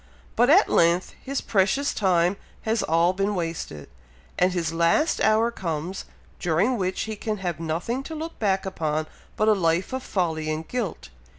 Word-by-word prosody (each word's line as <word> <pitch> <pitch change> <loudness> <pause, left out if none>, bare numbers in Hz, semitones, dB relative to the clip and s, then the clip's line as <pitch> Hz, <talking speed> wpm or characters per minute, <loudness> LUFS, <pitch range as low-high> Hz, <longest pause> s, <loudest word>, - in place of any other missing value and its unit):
But 245 +2 +4
at 375 +8 +6
length 170 +2 +2
his 275 0 -2
precious 250 +8 +1
time 180 -2 +2 0.3
has 220 0 +1
all 165 +3 +2
been 200 +2 0
wasted, 165 - -4 0.5
and 180 +1 +4
his 170 -3 -2
last 170 - +2
hour 220 +2 +3
comes, 170 -2 -4 0.3
during 180 +9 +2
which 185 -4 -1
he 220 0 -3
can 215 +1 -3
have 175 -4 -3
nothing 170 +10 -2
to 320 - -6
look 320 +2 -6
back 195 -3 +1
upon 155 -4 -1 0.3
but 215 - +1
a 215 - +6
life 175 +3 0
of 260 - -2
folly 160 -8 -1
and 155 +1 -4
guilt. 235 -9 -4
185 Hz, 170 wpm, -25 LUFS, 165-220 Hz, 0.5 s, at